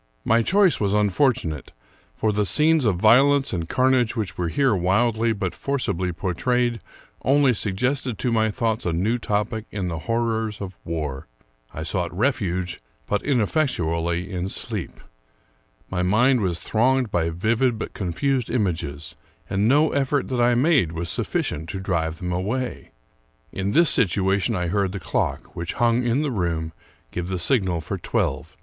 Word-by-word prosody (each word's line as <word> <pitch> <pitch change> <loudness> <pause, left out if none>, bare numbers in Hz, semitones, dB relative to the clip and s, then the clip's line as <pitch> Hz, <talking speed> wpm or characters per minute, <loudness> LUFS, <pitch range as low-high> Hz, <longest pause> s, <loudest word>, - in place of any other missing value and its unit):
My 115 +1 +4
choice 190 - +3
was 100 -1 +1
unfortunate; 105 - 0 0.4
for 110 - 0
the 105 +1 +1
scenes 150 - +3
of 105 -4 +3
violence 135 +8 +4
and 85 -3 -3
carnage 130 -3 +2
which 105 -6 -3
were 90 - -2
here 130 - +2
wildly 110 +5 +2
but 100 -4 -2
for 140 0 -2
cibly 90 -7 -1
portrayed 120 +7 0 0.4
only 140 -1 +4
suggested 120 +4 -1
to 120 +5 -1
my 110 -1 +2
thoughts 115 0 -1
a 85 - 0
new 105 +9 0
topic 105 +1 -2
in 95 -4 -3
the 80 -1 -4
horrors 115 0 -1
of 95 -2 -6
war. 75 -5 -4 0.4
I 80 - -6
sought 90 0 -2
refuge, 95 -8 -1 0.3
but 105 - -1
ineffectually, 90 - 0
in 90 0 -3
sleep. - - -3 0.9
My 90 -1 -2
mind 120 +7 +3
was 90 -4 0
thronged 125 +2 +1
by 85 -1 +1
vivid 110 +8 +1
but - - -6
confused 120 +7 -1
images, 80 - -2 0.4
and 100 +2 +2
no 150 +5 +4
effort 140 0 0
that 125 -2 0
I 120 0 +4
made 130 - +3
vv'as 85 0 -4
sufficient 80 0 -2
to 95 - -4
drive 80 -4 -1
them 90 +1 -4
away. 110 +9 -3 0.6
In 95 +1 -2
this 170 -2 +5
situation 100 0 +2
I 90 -2 -1
heard 100 0 0
the 100 - -4
clock, - - -2
which 85 0 -4
hung 120 0 +2
hi 120 +3 +1
the 145 - -1
room, 85 -6 -2 0.4
give 90 0 -4
the 95 0 -2
signal 90 -4 0
for 80 - -5
twelve. - - -2
105 Hz, 160 wpm, -23 LUFS, 90-125 Hz, 0.9 s, this